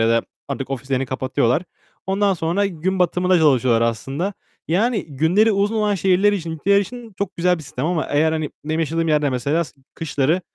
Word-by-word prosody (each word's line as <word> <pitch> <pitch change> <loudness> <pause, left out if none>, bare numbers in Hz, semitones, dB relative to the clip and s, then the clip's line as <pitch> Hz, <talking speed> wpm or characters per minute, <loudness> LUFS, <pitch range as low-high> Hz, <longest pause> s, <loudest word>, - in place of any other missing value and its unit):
ya 115 - +3
da 115 0 +3 0.3
artık 135 -1 -4
ofislerini 135 0 -2
kapatıyorlar. 130 +2 0 0.4
Ondan 195 0 +2
sonra 175 +5 0
gün 190 +1 -2
batımında 180 0 +2
çalışıyorlar 130 -6 +3
aslında. 135 - -1 0.4
Yani, 210 +5 +1
günleri 165 +10 +2
uzun 200 +3 +1
olan 210 -1 +1
şehirler 190 +2 +3
için, 170 -5 -3
ülkeler 200 +6 +2
için 230 +2 -7
çok 200 -1 -3
güzel 180 +1 +2
bir 155 - -9
sistem. 135 0 -4
Ama 170 -2 0
eğer, 155 +2 +2
hani, 155 -2 -2
benim 160 +2 -1
yaşadığım 165 +1 0
yerde 150 -2 +2
mesela 140 +7 0
d - - -11 0.3
kışları 155 +1 0
165 Hz, 180 wpm, -21 LUFS, 140-190 Hz, 0.4 s, ya